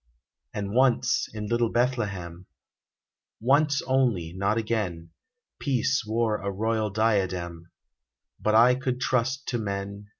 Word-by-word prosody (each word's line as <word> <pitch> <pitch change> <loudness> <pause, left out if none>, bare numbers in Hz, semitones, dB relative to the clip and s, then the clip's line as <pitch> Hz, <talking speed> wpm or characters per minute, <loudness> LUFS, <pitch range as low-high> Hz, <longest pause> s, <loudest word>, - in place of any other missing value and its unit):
And 100 -1 -4
once, 125 -1 +2
in 105 -1 -5
little 120 +1 +1
Bethlehem 100 -9 -2 0.5
— - - -66 0.2
Once 140 +4 +2
only, 120 -11 +1
not 100 +4 0
again 105 -8 -2 0.2
— 250 - -61
Peace 135 0 0
wore 110 -1 +1
a 100 - -4
royal 110 +2 -1
diadem: 95 -6 -1 0.7
But 110 0 +1
I 120 +3 +7
could 130 0 -2
trust 130 +2 0
to 120 - -1
men. 100 0 -5
110 Hz, 130 wpm, -26 LUFS, 100-125 Hz, 0.7 s, I